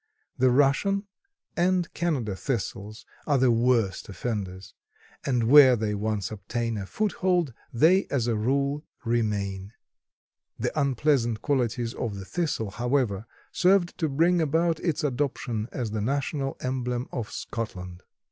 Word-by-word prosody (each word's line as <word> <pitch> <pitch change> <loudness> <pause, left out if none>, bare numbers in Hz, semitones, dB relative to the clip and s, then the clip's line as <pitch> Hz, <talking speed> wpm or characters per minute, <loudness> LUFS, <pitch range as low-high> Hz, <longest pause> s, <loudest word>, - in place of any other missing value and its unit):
The 130 0 +3
Russian 145 +10 +2 0.5
and 180 0 +1
Canada 135 - -1
thistles 110 -3 -4 0.2
are 145 -2 +3
the 130 -1 +4
worst 115 -4 +1
offenders, 95 -3 -5 0.5
and 125 -4 +2
where 130 +1 +8
they 110 -2 -1
once 105 -1 -2
obtain 115 +3 -3
a 95 - -6
foothold 180 - 0 0.2
they, 170 +11 +4
as 130 -5 0
a 120 -2 +1
rule, 140 +6 0 0.2
remain. 105 -4 -1 0.8
The - - -1
unpleasant 135 -5 +1
qualities 120 -4 0
of 110 -5 -3
the 95 - -7
Thistle, 145 - -2
however, 120 -3 0 0.2
served 185 -1 +3
to 160 -3 +1
bring 170 +5 +3
about 160 +2 +1
its 165 -5 -1
adoption 125 -5 -2
as 120 -5 -3
the 110 -1 -2
national 140 +3 -1
emblem 125 -1 -2
of 115 -5 -4
Scotland. 90 -6 -6
125 Hz, 130 wpm, -26 LUFS, 110-145 Hz, 0.8 s, where